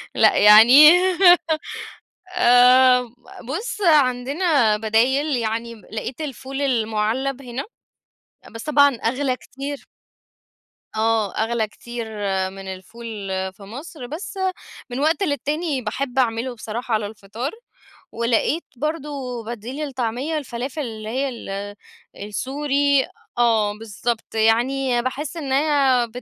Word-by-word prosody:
لأ - - +4
يعني. 235 +8 +9 1.5
آآ 250 -2 +6 0.5
بُص 420 - -4
عندنا 280 - +3
بدايل، 250 +7 +1
يعني 230 0 -3
لقيت 225 +5 -7
الفول 275 -2 -5
المُعلّب 240 +2 -1
هنا، 250 +1 -5 0.9
بس 225 0 -9
طبعًا 285 -2 +4
أغلى 255 +3 -1
كتير. 275 +2 -8 1.1
آه 220 -2 +1
أغلى 225 0 0
كتير 235 +2 -7 0.5
من 195 0 -10
الفول 220 +5 -9 0.5
في 195 - -18
مصر، 250 +6 -9
بس 340 +9 -7 0.5
من 245 +2 -4
وقت 320 +6 +1
للتاني 295 -2 -1
باحب 250 +4 -3
أعمله 245 0 0
بصراحة 230 +1 -4
على 215 -1 0
الفطار، 220 +6 -6 0.6
ولقيت 235 +8 0
برضه 275 -4 -4
بديل 235 +3 -7
للطعمية 260 +4 -2
الفلافل 260 +1 -5
اللي 220 -4 -6
هي 265 +5 -1
ال 205 -4 -6 0.4
السوري. 275 +6 0 0.3
آه 225 -3 +3
بالضبط، 225 +1 -4
يعني 240 +3 +2
باحس 275 +6 -4
إن 285 -5 -4
هي 270 -4 +2
250 Hz, 105 wpm, -22 LUFS, 225-280 Hz, 1.5 s, يعني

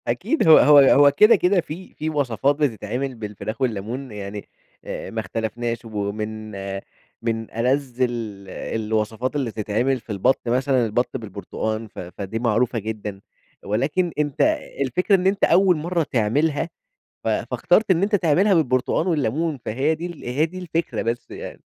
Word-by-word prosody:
أكيد 320 - 0
هو 160 - +10
هو 150 0 +7
هو 140 +1 +7
كده، 210 +11 +6
كده 180 -1 +2
في 170 +4 -9
في 155 - -3
وصفات 140 -2 +1
بتتعمل 130 -1 -2
بالفراخ 110 +1 -6
والليمون، 120 +2 -2
يعني 105 0 -7 0.4
أ - - -5
ما 115 - -4
اختلفناش 115 +2 -3
ومن 110 0 -4 0.7
من 115 -1 -3
ألذّ 130 +2 -1
ال 110 -6 -2
الوصفات 110 +5 -2
اللي 135 -5 -1
تتعمل 110 +5 0
في 110 0 -10
البطّ 105 +6 +2
مثلًا 130 +1 +2
البط 120 +4 -1
بالبرتقان، 110 +1 -4
ف - - -12
فدي 95 +4 -5
معروفة 115 +1 +1
جدًا، 105 -2 -5 0.4
ولكن 150 - 0
أنت 145 0 0 0.4
الفكرة 160 - +2
إن 185 0 +1
أنت 195 +1 0
أول 180 +1 +5
مرّه 170 +2 0
تعملها، 145 +6 0 0.5
ف - - -3
فاخترت 220 -3 +2
إن 180 +1 +3
أنت 205 +1 +2
تعملها 190 +3 +3
بالبرتقان 140 +1 +1
والليمون، 155 0 0
فهي 135 +8 0
دي 170 -2 -7
هي 140 +6 +2
دي 185 +3 -8
الفكرة 165 -7 -2
بس 115 +1 -3
يعني. - - -8
125 Hz, 150 wpm, -22 LUFS, 110-155 Hz, 0.7 s, هو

